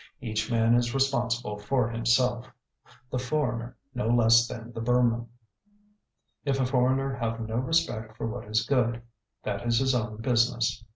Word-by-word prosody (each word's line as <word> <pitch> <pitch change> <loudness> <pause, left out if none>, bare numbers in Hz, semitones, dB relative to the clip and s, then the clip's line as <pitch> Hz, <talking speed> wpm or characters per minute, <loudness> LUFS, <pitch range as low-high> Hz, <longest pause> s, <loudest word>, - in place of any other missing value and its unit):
Each 110 -4 -3
man 115 0 +3
is 120 +1 +1
responsible 120 -5 0
for 120 +3 0
himself, 120 +1 +1 0.6
the 130 - -1
foreigner 125 -3 -2 0.2
no 125 -3 -2
less 115 0 +5
than 120 0 -8
the 115 - -5
Burman. 120 0 +2 1.2
If 135 -1 0
a 130 - +2
foreigner 130 +1 +1
have 115 -1 -2
no 110 0 -3
respect 125 -6 -1
for - - -3
what 115 +2 -5
is 110 +1 0
good, 120 -3 +1 0.4
that 100 -2 -3
is 115 -1 +3
his 130 +2 +2
own 110 -3 -2
business. 115 -1 +1
120 Hz, 155 wpm, -27 LUFS, 115-125 Hz, 1.2 s, less